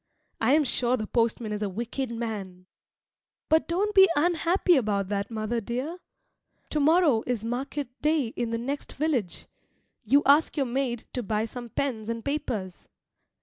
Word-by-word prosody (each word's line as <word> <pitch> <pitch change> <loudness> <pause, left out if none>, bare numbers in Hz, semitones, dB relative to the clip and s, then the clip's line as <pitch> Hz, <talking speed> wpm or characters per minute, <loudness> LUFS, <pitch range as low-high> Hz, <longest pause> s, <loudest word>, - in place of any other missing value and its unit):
I 240 +4 +3
am 305 +1 +5
sure 250 -1 +1
the 215 - -3
postman 230 -1 0
is 210 0 -3
a 205 - -1
wicked 235 +6 -4
man. 210 -6 -5 0.8
But 315 +1 +3
don't 395 +5 0
be 385 -2 +7
unhappy 345 +3 +3
about 205 -7 0
that, 200 -1 -2
mother 225 +1 -2
dear. 255 - -4 0.7
To 305 - +1
morrow 300 -5 +4
is 235 -3 -2
market 265 +4 -3
day 300 -5 +2
in 235 0 -3
the 230 - -1
next 275 +5 -4
village. 270 - -1 0.6
You 275 +6 +4
ask 295 +4 +4
your 275 - +2
maid 245 -2 -2
to 250 - -2
buy 215 0 -1
some 240 +1 -8
pens 230 -4 -2
and 230 -1 -4
papers. 225 -11 -3
240 Hz, 160 wpm, -27 LUFS, 220-290 Hz, 0.8 s, be